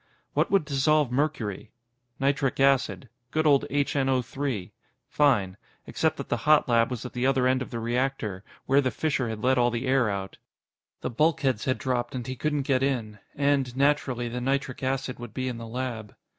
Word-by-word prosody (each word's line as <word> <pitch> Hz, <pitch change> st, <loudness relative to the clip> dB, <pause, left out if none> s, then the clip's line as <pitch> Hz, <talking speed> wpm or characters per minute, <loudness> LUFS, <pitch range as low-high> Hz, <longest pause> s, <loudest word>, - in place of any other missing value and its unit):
What -, -, +1 dB
would 195 Hz, -6 st, +3 dB
dissolve 145 Hz, -1 st, +2 dB
mercury? 125 Hz, -7 st, -2 dB, 0.5 s
Nitric 140 Hz, -1 st, 0 dB
acid. 135 Hz, -1 st, +2 dB, 0.2 s
Good 155 Hz, +3 st, 0 dB
old 145 Hz, -1 st, +4 dB
HNO. 135 Hz, -5 st, -1 dB, 0.4 s
Fine. 105 Hz, -11 st, +2 dB, 0.3 s
Except -, -, 0 dB
that -, -, -6 dB
the -, -, 0 dB
hot 155 Hz, -1 st, +6 dB
lab 115 Hz, -1 st, +3 dB
was 125 Hz, -1 st, -5 dB
at 125 Hz, -, -7 dB
the 125 Hz, +1 st, 0 dB
other 135 Hz, -2 st, +2 dB
end 130 Hz, 0 st, +2 dB
of 130 Hz, -, -5 dB
the 115 Hz, -, -4 dB
reactor, 115 Hz, -4 st, -2 dB, 0.2 s
where 135 Hz, +2 st, +4 dB
the 130 Hz, -, +1 dB
fissure 130 Hz, -5 st, -1 dB
had 110 Hz, -1 st, -5 dB
let 130 Hz, 0 st, +3 dB
all 120 Hz, 0 st, +4 dB
the 120 Hz, +2 st, -3 dB
air 130 Hz, -3 st, +3 dB
out. 100 Hz, -1 st, -5 dB, 0.6 s
The -, -, -3 dB
bulkheads 135 Hz, -3 st, +1 dB
had 130 Hz, 0 st, +1 dB
dropped, 125 Hz, -1 st, -2 dB
and 125 Hz, -2 st, -4 dB
he 130 Hz, -, -4 dB
couldn't 150 Hz, +1 st, -1 dB
get 130 Hz, -2 st, +1 dB
in. 115 Hz, -6 st, -1 dB, 0.2 s
And, 140 Hz, -3 st, +1 dB
naturally, 135 Hz, -4 st, +1 dB
the 125 Hz, +1 st, -4 dB
nitric 135 Hz, 0 st, -1 dB
acid 130 Hz, -1 st, -2 dB
would 120 Hz, -2 st, -9 dB
be 130 Hz, -1 st, -2 dB
in 120 Hz, -2 st, -4 dB
the 115 Hz, -, -7 dB
lab. 115 Hz, -3 st, -5 dB
130 Hz, 185 wpm, -27 LUFS, 120-140 Hz, 0.6 s, hot